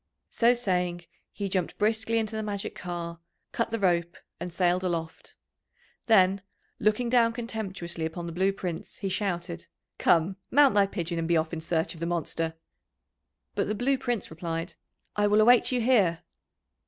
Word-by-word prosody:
So 240 +1 +4
saying 180 -6 -1 0.3
he 200 - -4
jumped 185 -3 -2
briskly 220 +2 +1
into 220 -1 -1
the 220 - -1
magic 205 -2 -3
car, 170 -1 -5 0.3
cut 230 - -1
the 230 - -1
rope, 175 -3 +1 0.2
and 180 - -5
sailed 180 +1 +1
aloft. 165 -3 -4 0.7
Then, 195 -3 +5 0.4
looking 215 +3 +2
down 235 -1 +4
contemptuously 200 -8 -4
upon 160 +2 -4
the 170 - -5
Blue 190 +4 +2
Prince, 180 -4 -5
he 195 - -3
shouted: 175 -4 -3 0.3
"Come, 175 +3 +3
mount 285 0 +6
thy 200 -1 +4
pigeon, 170 -2 -3
and 165 - -1
be 170 0 +3
off 160 +1 -1
in 165 - -3
search 165 +1 -1
of 165 - -12
the 170 - -2
monster." 165 -1 -2 1.0
But - - 0
the 210 - -1
Blue 260 +6 +2
Prince 240 -9 -2
replied, 165 +1 -4 0.4
"I 205 0 +3
will 210 +1 +4
await 240 +4 +6
you 250 -1 +1
here." 205 -9 +3
185 Hz, 165 wpm, -28 LUFS, 170-220 Hz, 1.0 s, mount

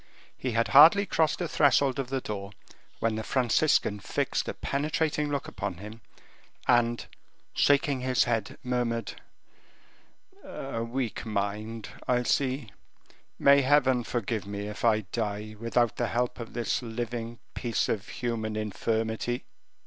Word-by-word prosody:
He 130 -2 -3
had 115 +1 +1
hardly 165 +8 +8
crossed 160 -4 +1
the 175 - -2
threshold 140 -3 +3
of 130 -2 -3
the 135 -1 -1
door 100 -2 -5 0.4
when 115 -1 0
the 110 - -3
Franciscan 125 -3 +2
fixed - - -1
a - - -4
penetrating 150 +1 -1
look 140 -1 -2
upon 100 -3 -4
him, 105 +4 -10 0.7
and, 120 -1 +3 0.5
shaking 140 -1 +3
his 130 -1 +2
head, 115 -4 -2
murmured 120 -2 -1 1.3
"A 115 -4 -5
weak 120 0 -3
mind, 105 +1 -3 0.2
I 125 -1 +2
see; 130 -3 0 0.7
may 140 0 +6
Heaven 130 -2 +3
forgive 110 -3 -2
me 100 0 -4
if 105 - -7
I 110 -2 +4
die 110 -1 -3
without 115 0 +1
the - - 0
help 125 +1 -1
of 115 - -7
this 120 +1 -1
living 120 0 -4 0.2
piece 115 -3 -1
of 105 -1 -2
human 110 -3 -3
infirmity." 110 +3 -2
120 Hz, 135 wpm, -28 LUFS, 110-130 Hz, 1.3 s, hardly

